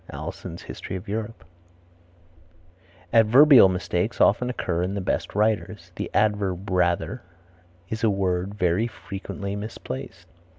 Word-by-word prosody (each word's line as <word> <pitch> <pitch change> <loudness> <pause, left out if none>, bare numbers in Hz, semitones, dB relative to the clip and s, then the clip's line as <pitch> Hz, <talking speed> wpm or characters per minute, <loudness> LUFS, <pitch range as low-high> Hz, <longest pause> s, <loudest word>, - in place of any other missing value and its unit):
Alison's - - -7
History - - -7
of 90 - -7
Europe. 110 +2 -5 1.7
Adverbial 120 +1 +7
mistakes 90 +3 -2
often 125 +4 +3
occur 90 -8 -2
in 95 +3 -2
the - - -2
best 95 - -2
writers. 105 -4 -1
The - - -4
adverb 100 -3 0
rather 90 +7 0 0.7
is 110 +4 -5
a 110 - +4
word 95 0 -1
very 90 +3 +1
frequently 100 -2 -6
misplaced. 100 -10 -7
100 Hz, 120 wpm, -24 LUFS, 90-110 Hz, 1.7 s, Adverbial